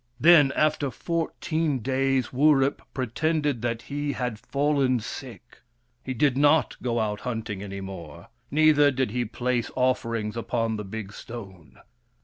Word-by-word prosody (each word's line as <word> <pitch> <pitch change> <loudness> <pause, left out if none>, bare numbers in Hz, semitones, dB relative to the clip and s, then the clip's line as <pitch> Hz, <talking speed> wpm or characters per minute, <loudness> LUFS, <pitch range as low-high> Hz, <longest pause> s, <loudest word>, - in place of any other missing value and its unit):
Then, 155 -4 +7
after 150 -2 +1
fourteen 160 +1 -2
days, 130 0 0
Wurip 140 0 +3
pretended 145 +1 -1
that 115 -1 -2
he 145 0 -3
had 125 -4 -3
fallen 140 -2 +1
sick. 120 +1 -9 0.4
He 130 - -4
did 140 +2 +2
not 145 -1 +3
go 120 -2 0
out 105 -1 -1
hunting 110 -5 -4
any 100 -1 -6
more, 85 -4 -9 0.2
neither 150 -1 +5
did 130 -4 -1
he 120 +1 -1
place 120 +1 -1
offerings 115 -4 0
upon 115 -1 -1
the 105 - -4
big 105 0 -7
stone. 95 -10 -10
125 Hz, 135 wpm, -26 LUFS, 110-145 Hz, 0.4 s, Then